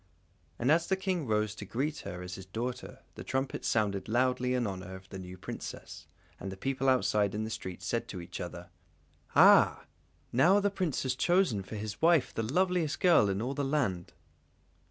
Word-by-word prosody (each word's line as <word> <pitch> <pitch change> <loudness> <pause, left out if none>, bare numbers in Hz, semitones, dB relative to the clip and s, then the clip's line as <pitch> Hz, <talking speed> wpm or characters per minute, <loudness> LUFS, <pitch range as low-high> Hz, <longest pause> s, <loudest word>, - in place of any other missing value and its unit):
And 125 +4 +2
as 165 +1 +3
the 190 - +2
King 185 -6 -2
rose 105 -1 +1
to 110 - -8
greet 140 +9 -2
her 90 0 -7
as 90 0 -7
his 95 0 -9
daughter, 120 +6 -5
the - - -9
trumpets 135 0 -2
sounded 100 -3 0
loudly 125 +1 +1
in 125 -1 0
honour 95 -2 -5
of 95 0 -12
the 95 - -7
new 90 0 -9
Princess, 90 - -8 0.3
and 95 - -5
the 95 - -8
people 135 +4 0
outside 105 -6 +2
in 110 - -1
the 110 - -4
street 95 -3 -6
said 115 +5 -2
to 95 - -6
each 85 +1 -7
other: 90 0 -7 0.6
"Ah! - - +6 0.5
now 170 +11 +5
the 205 0 +1
Prince 185 -7 -1
has 130 -1 0
chosen 175 - +2
for 95 +3 -8
his 105 0 -6
wife 165 -3 +4
the - - -2
loveliest 170 +5 0
girl 170 - +5
in 100 +3 -1
all 130 +3 -2
the 140 0 -2
land!" 130 - -1
115 Hz, 195 wpm, -30 LUFS, 95-145 Hz, 0.6 s, Ah